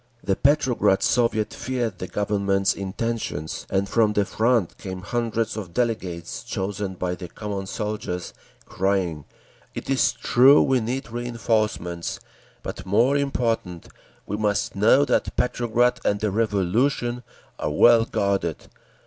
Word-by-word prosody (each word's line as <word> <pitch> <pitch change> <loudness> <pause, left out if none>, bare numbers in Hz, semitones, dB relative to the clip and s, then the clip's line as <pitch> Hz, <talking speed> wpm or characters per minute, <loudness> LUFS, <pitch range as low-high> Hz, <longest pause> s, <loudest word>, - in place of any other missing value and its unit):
The 95 - +1
Petrograd 130 -8 +2
Soviet 115 -3 +1
feared 120 -7 -3
the 90 - -4
Government's 100 -1 +1
intentions, 100 -5 -4
and 95 0 0
from 110 0 +2
the 105 -1 +2
Front 115 -2 +1
came 95 -2 -6
hundreds 115 0 -1
of 95 -6 -7
delegates, 95 -8 -2
chosen 100 0 -3
by 90 0 -2
the 90 0 -7
common 100 0 -5
soldiers, 105 -4 -4 0.3
crying, 95 -6 -1 0.5
"It - - -4
is 135 - +3
true 135 +4 +5
we 135 -1 +3
need 120 +2 -4
reinforcements, 110 -7 -2 0.4
but - - -6
more 115 +9 +3
important, 115 -11 -1 0.4
we 105 - -3
must 105 -2 0
know 115 +8 +5
that - - 0
Petrograd 120 0 +1
and 100 - +1
the 105 -1 -1
Revolution 115 +4 0 0.4
are - - -1
well 115 +9 +6
guarded…. 100 -7 -1
105 Hz, 130 wpm, -24 LUFS, 95-120 Hz, 0.5 s, well